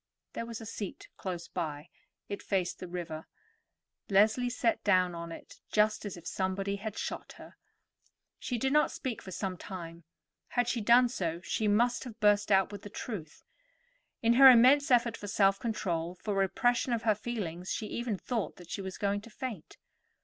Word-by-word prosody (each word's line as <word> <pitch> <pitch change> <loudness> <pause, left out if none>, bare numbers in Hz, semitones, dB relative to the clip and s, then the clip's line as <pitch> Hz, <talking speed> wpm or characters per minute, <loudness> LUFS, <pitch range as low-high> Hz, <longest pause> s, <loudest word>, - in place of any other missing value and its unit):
There 230 - -4
was 230 -1 -6
a 225 - -8
seat 205 -3 -6
close 175 -3 -5
by; 155 -2 -4 0.4
it 200 - -5
faced 185 -3 -1
the 185 - -6
river. 170 -3 -6 0.8
Leslie 215 +5 +4
sat 235 -1 0
down 185 -3 +3
on 170 0 -6
it - - -11
just 215 0 +2
as 200 -3 -5
if 170 - -13
somebody 195 +1 -1
had 215 +1 -6
shot - - -5
her. - - -13 0.8
She 245 - -2
did 265 +4 0
not 300 0 +4
speak 255 -5 -4
for - - -10
some 185 0 -3
time. 170 -3 -8 0.4
Had 245 -1 0
she 240 -1 0
done 240 +3 +6
so, 170 -9 -3
she 215 +3 -1
must 235 +4 +2
have 230 -2 -9
burst 205 -1 +3
out 195 0 +4
with 205 -1 -7
the 205 - -9
truth. 190 -9 -7 0.8
In 230 +1 +5
her 265 +2 +10
immense 260 +4 +6
effort 235 -2 +3
for 205 - -8
self 195 0 +3
control, 180 -7 -2
for 205 +3 -4
repression 240 +6 +1
of 230 - -1
her 220 -2 +4
feelings, 195 -6 -4
she 220 - -2
even 235 -1 -3
thought 230 +1 -3
that 175 -1 -13
she 200 - -3
was 190 -1 -6
going 200 0 0
to 230 - -13
faint. 225 -6 -7
205 Hz, 185 wpm, -31 LUFS, 185-235 Hz, 0.8 s, her